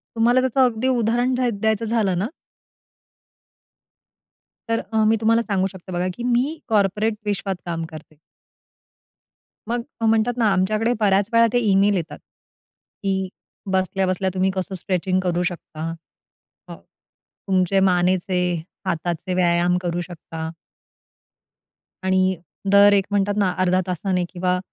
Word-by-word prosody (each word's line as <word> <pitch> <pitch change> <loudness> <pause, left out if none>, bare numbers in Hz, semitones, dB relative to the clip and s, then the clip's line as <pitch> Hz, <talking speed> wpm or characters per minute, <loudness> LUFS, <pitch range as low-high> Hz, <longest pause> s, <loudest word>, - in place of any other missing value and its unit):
तुम्हाला 240 +3 +4
त्याचं 260 +1 +1
अगदी 245 +1 -1
उदाहरण 240 0 +1
द्या 250 -1 +1
द्यायचं 220 +1 +1
झालं 215 -5 +1
ना 200 - 0 2.4
तर 230 0 +1
अ, - - +1
मी 225 - +4
तुम्हाला 230 +1 +3
सांगू 195 -4 0
शकते 190 -1 -11
बघा 180 +1 -1
की 240 - -5
मी 250 +6 0
कॉर्पोरेट 210 0 +1
विश्वात 200 -1 -1
काम 165 -1 -3
करते. 155 -1 -12 1.5
मग 240 0 0 0.2
म्हणतात 225 +2 +2
ना, 230 - +3
आमच्याकडे 215 +5 +1
बऱ्याच 200 0 +2
वेळा 230 0 +6
ते 245 - +4
ईमेल 200 +1 +4
येतात 170 -2 -5 0.9
की 190 -1 -1 0.4
"बसल्या-बसल्या 190 0 0
तुम्ही 190 0 +1
कसं 190 0 -3
स्ट्रेचिंग 185 +1 -1
करू 180 -1 0
शकता. 165 -3 -5 0.8
अ, - - -8 0.7
तुमचे 190 0 +2
मानेचे, 185 0 +2 0.5
हाताचे 175 +2 -2
व्यायाम 175 0 +2
करू 175 0 -2
शकता." 165 -2 -7 1.5
"आणि 190 0 +2 0.4
दर 200 0 +7
एक 195 -1 +3
म्हणतात 205 0 +1
ना 190 -3 +2
0.5 185 0 +3
तासाने 180 +1 -1
किंवा 180 0 -1
190 Hz, 125 wpm, -22 LUFS, 180-220 Hz, 2.4 s, दर